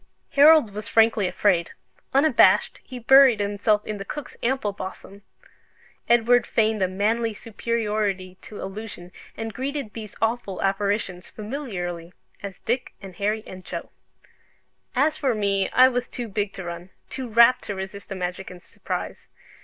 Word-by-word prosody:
Harold 290 -6 +6
was 210 +1 -6
frankly 225 -4 +3
afraid: 180 -2 +1 0.4
unabashed, 280 +4 +4
he 255 - -9
buried 260 -1 +6
himself 205 +1 +1
in 210 -1 -5
the - - -4
cook's 280 +6 -7
ample 245 -3 0
bosom. 195 +1 -9 0.9
Edward 240 +1 +4
feigned 220 -2 +1
a 185 - +3
manly 215 +4 0
superiority 210 -4 -2
to 210 - -10
illusion, 195 -2 -8 0.3
and 225 -1 -5
greeted 270 -3 -4
these 215 -3 -8
awful 225 -4 -1
apparitions 195 -2 -1
familiarly, 190 - -6 0.3
as 195 -2 -7
Dick 245 +2 -2
and 190 -3 -11
Harry 210 +2 -1
and 185 0 -10
Joe. - - -7 1.0
As 300 +4 +2
for 265 -5 +1
me, 200 -2 0
I 255 +1 +6
was 250 -1 -2
too 240 -2 -5
big 205 -1 -2
to 190 - -7
run, 175 +1 -7 0.2
too 260 -2 -5
rapt 235 +3 +5
to 205 - -4
resist 190 +1 -7
the 195 - -4
magic 180 +1 -4
and 180 - -11
surprise. - - -6
210 Hz, 150 wpm, -24 LUFS, 195-235 Hz, 1.0 s, Harold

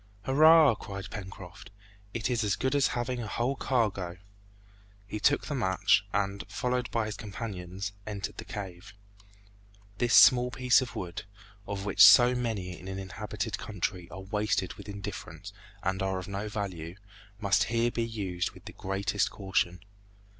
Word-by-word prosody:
"Hurrah!" 155 +3 +7
cried 100 -3 -8
Pencroft; 95 -1 -9 0.4
"it 110 -2 -2
is 120 -2 0
as 105 -1 +1
good 130 - -1
as 140 -2 +4
having 120 +1 -2
a 110 - -5
whole 120 +6 -1
cargo!" 100 -10 -1 0.9
He 105 +1 -5
took 145 +7 +3
the 150 - -4
match, 95 -9 +2
and, 100 0 -1
followed 125 0 -1
by 115 -2 0
his 105 0 -4
companions, 100 -3 -6 0.2
entered 100 -2 -5
the - - -6
cave. 100 0 -8 1.0
This 120 -1 +3
small 125 -1 +7
piece 125 +1 +3
of 125 - -6
wood, 90 +1 -5 0.4
of 100 -1 -4
which 100 0 +5
so 120 +5 +9
many 110 -8 -3
in 95 - -11
an 95 0 -5
inhabited 100 +2 -4
country 95 -3 -4
are 95 - -8
wasted 100 -2 -1
with - - -11
indifference 100 -1 -7 0.3
and 95 0 -1
are 95 0 0
of 90 - -6
no 100 +2 -4
value, 90 -5 -5 0.4
must 100 -2 +3
here 115 +1 +1
be 120 - -2
used 100 -6 -3
with - - -16
the - - -9
greatest 100 +1 -1
caution. 95 -3 -1
105 Hz, 160 wpm, -29 LUFS, 95-120 Hz, 1.0 s, so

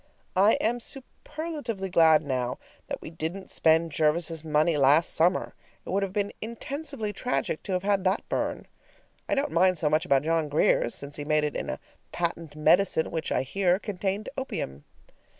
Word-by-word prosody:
I 200 +4 +5
am 240 +2 0
superlatively 265 - -5
glad 160 -2 +5
now 125 -3 -2 0.3
that - - -4
we - - -8
didn't 165 +4 -5
spend 160 0 +3
Jervis's 160 +1 +1
money 155 +1 +2
last 145 +3 +4
summer; 175 +3 +2 0.3
it - - -6
would 195 +2 +1
have 195 -1 -2
been 205 +1 -1
intensively 235 0 -5
tragic 250 -10 -2
to 195 - -4
have 180 0 -1
had 200 -1 +1
that 190 +3 0
burn. - - -2 0.6
I - - +2
don't 280 +1 0
mind 185 +2 +4
so 150 -2 +1
much 155 +1 +3
about 135 0 +2
John 160 -1 0
Grier's, 145 -4 +2
since 140 +1 -5
he 145 - -4
made 155 0 +2
it 150 - -2
in - - -3
a - - -3 0.3
patent 165 -3 -3
medicine 160 +2 +3
which, 160 -2 -3
I - - +1
hear, 180 +6 +1
contained 200 0 -3
opium. 70 - -5
170 Hz, 175 wpm, -27 LUFS, 155-200 Hz, 0.6 s, I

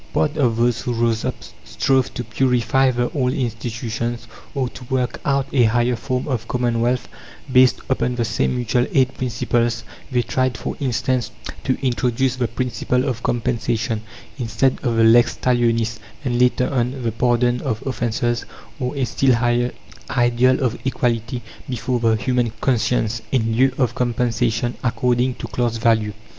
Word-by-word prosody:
Part 150 0 +1
of 125 -7 +2
those 120 0 +2
who 125 - -2
rose 115 -1 +1
up - - -1 0.3
strove 135 -1 +1
to 125 - -3
purify 125 +2 +2
the 120 -1 0
old 130 -3 0
institutions, 115 -2 -3 0.3
or 135 -2 0
to 125 - -11
work 125 0 -1
out 140 -1 +1
a 125 -4 +5
higher 120 +2 +2
form 130 +4 -3
of 125 -6 -2
commonwealth, 120 0 0 0.5
based 130 -1 +5
upon 125 -1 0
the 120 -1 0
same 120 - 0
Mutual 120 0 +1
Aid 130 -1 +3
principles; 120 -1 0 0.3
they 125 -1 +2
tried, 130 +1 0
for - - -4
instance, 130 -2 0 0.4
to 130 - +1
introduce 125 +1 +1
the 125 -2 0
principle 125 +1 -1
of 130 -2 -2
"compensation," 115 -1 -1 0.4
instead 120 +2 +1
of 120 -3 0
the 115 - +4
lex 115 +2 +5
talionis, 115 -3 +1 0.3
and 120 -1 0
later 125 0 +3
on, 125 0 -1
the 115 - 0
pardon 120 +1 +1
of 115 -6 -3
offences, 120 -2 -1 0.4
or 125 +2 -2
a 135 -2 0
still 130 +1 +2
higher 120 +1 +1 0.4
ideal 120 +1 +3
of 120 -2 0
equality 120 -2 -1 0.3
before 125 0 -1
the 115 -1 +3
human 120 0 0
conscience, 115 -3 +1
in 115 -4 +1
lieu 130 +3 +4
of 125 -4 +1
"compensation," 120 -1 0
according 125 +1 +1
to - - -6
class 120 -2 -1
value. 110 -2 +2
120 Hz, 155 wpm, -21 LUFS, 115-130 Hz, 0.5 s, a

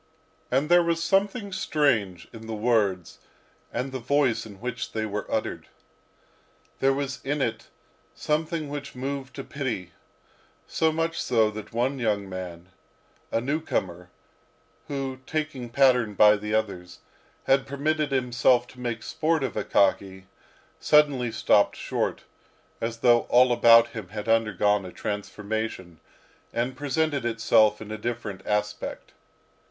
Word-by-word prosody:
And 135 +4 +1
there 175 +1 +6
was 170 -1 0
something 200 +3 +1
strange 125 - 0
in 115 -1 -10
the 110 - -4
words 105 -6 0 0.5
and 125 +3 -3
the 130 - -4
voice 125 -3 +1
in 100 -3 -13
which 125 0 -5
they 110 -1 -1
were 105 -1 -4
uttered. - - -2 1.1
There 135 - +3
was 140 0 -3
in 145 +2 -1
it 115 -4 -2 0.5
something 155 +1 -1
which 145 -1 -7
moved 135 0 -5
to 135 - -6
pity; 120 - -4 0.7
so 160 0 +1
much 165 +1 -1
so 110 -3 +2
that 105 -1 -8
one 125 +4 -1
young 105 -4 0
man, 90 -2 -7 0.6
a - - +1
newcomer, 95 - -2 0.8
who, 135 -2 -4
taking 150 -6 -3
pattern 125 -4 +3
by 105 +1 +7
the 105 +1 -3
others, 100 -5 -3 0.4
had 135 0 +2
permitted 150 +1 -1
himself 125 -1 +2
to 125 - -15
make 120 -2 -4
sport 160 -1 0
of 130 - -2
Akaky, 95 -1 +1 0.6
suddenly 145 -6 +3
stopped 110 -2 +3
short, - - -2 0.6
as 115 0 -4
though 120 -1 +4
all 125 +1 +5
about 115 -1 +6
him 110 -5 -7
had 105 +2 -6
undergone 105 -3 +2
a 90 - -8
transformation, 105 -4 -4 0.5
and 120 +2 -2
presented 145 0 -1
itself 110 -2 +3
in 105 - -10
a 110 - -5
different 110 -4 -4
aspect. 105 0 -3
120 Hz, 135 wpm, -26 LUFS, 105-140 Hz, 1.1 s, by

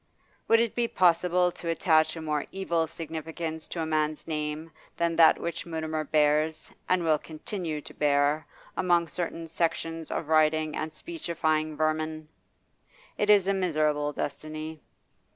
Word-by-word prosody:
Would 230 - +5
it 230 -1 +1
be 240 -1 +1
possible 180 -1 +3
to 170 - -6
attach 160 -1 +3
a 165 - -6
more 150 -1 -1
evil 170 -4 0
significance 160 0 -5
to 170 - -4
a - - -2
man's 155 -1 0
name 155 +1 -3 0.3
than 170 0 +1
that 165 -1 +7
which 170 0 -4
Mutimer 160 -1 -2
bears, 155 +1 +1 0.2
and 185 -1 +3
will 155 -2 +3
continue 160 -1 -5
to - - -11
bear, 145 +1 +2 0.3
among 175 -2 +2
certain 165 0 -4
sections 165 0 -2
of 160 - -3
writing 155 0 +3
and 155 - -3
speechifying 155 - -2
vermin? 155 0 -1 0.9
It 210 - 0
is 200 -3 +6
a 195 - +3
miserable 155 -5 +1
destiny. 155 +2 -5
160 Hz, 145 wpm, -28 LUFS, 155-170 Hz, 0.9 s, that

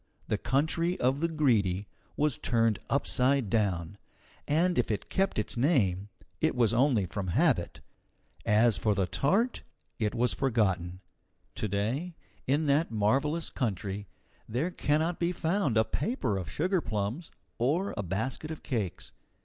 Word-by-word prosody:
The - - 0
country 165 +6 +1
of 130 +3 +2
the 165 - +2
Greedy 110 - +1 0.3
was 150 -2 +1
turned 115 -3 +1
upside 135 -4 +2
down, 100 -3 0 0.5
and 170 +4 +2
if - - +1
it 105 - -3
kept 195 0 +1
its 105 - 0
name, 105 - +1 0.3
it 160 -2 +1
was 120 -2 +3
only 120 -5 +3
from 95 +2 -4
habit. 85 - +1 0.6
As 110 +1 +4
for 105 -2 +1
the 95 -1 +1
tart, 195 - +1 0.4
it 105 -2 0
was 120 +1 +2
forgotten. 95 -9 0 0.5
To 110 - -3
day, 120 - -2 0.3
in 145 +4 +2
that 145 +3 +2
marvellous 135 +10 0
country, 100 -4 -3 0.4
there 135 +11 -1
cannot 160 +1 0
be 170 0 +1
found 165 - 0
a 110 - +4
paper 140 - -1
of 90 -3 -4
sugarplums 150 - -1 0.3
or 155 +11 +1
a 100 - -2
basket 110 - -3
of 160 - -7
cakes. 110 - -3
125 Hz, 140 wpm, -29 LUFS, 105-155 Hz, 0.6 s, As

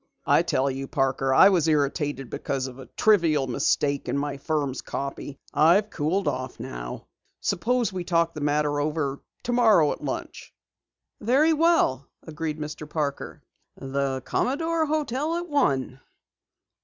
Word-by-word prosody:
"I - - +4
tell 135 - 0
you, 135 +1 -5
Parker, 135 -1 0
I 130 - +7
was 175 -5 +2
irritated 145 -3 0
because 135 -2 -2
of 130 0 -8
a 130 - -10
trivial 165 -10 +3
mistake 140 +2 0
in - - 0
my 140 0 -2
firm's 140 -2 -2
copy. 140 0 -5 0.2
I've 180 +7 +4
cooled 165 +4 -1
off 130 -2 -3
now. - - -7 0.3
Suppose 235 +3 0
we 185 -1 -3
talk 170 -1 +2
over - - -31
the 155 - -7
matter 145 -1 0 0.2
tomorrow 225 -11 +4
at - - -6
lunch." - - -6 0.6
"Very 275 +9 +3
well," 315 - +2 0.2
agreed 160 -1 -4
Mr. 150 0 -7
Parker. 150 -3 -4 0.3
"The 135 -1 -2
Commodore 325 +4 0
Hotel 300 +1 -1
at 345 +1 -3
one." 135 - 0
150 Hz, 140 wpm, -25 LUFS, 135-210 Hz, 0.6 s, I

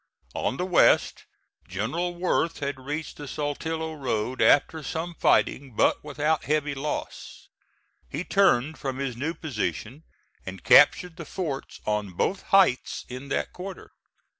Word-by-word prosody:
On 130 - -2
the 180 - -1
west 180 -2 +3 0.4
General 155 - -2
Worth 175 -2 0
had 140 -2 -4
reached 145 +4 -5
the 145 - -8
Saltillo 160 +3 -3
road 130 -4 -2
after 155 +2 +4
some 165 +3 -4
fighting 135 -5 +1
but - - +2
without 150 +1 -1
heavy 150 -1 0
loss. 140 +2 -6 0.6
He 150 +6 -4
turned 160 -8 +2
from 135 -2 -3
his 135 -3 -3
new 150 +8 -3
position 120 - -4 0.4
and 95 0 -8
captured 165 +3 +6
the 170 - -7
forts 150 -8 -5
on 105 -3 -1
both 185 - -1
heights 190 -10 +3
in 130 +2 -7
that - - -2
quarter. 190 +1 -8
145 Hz, 140 wpm, -26 LUFS, 130-165 Hz, 0.6 s, captured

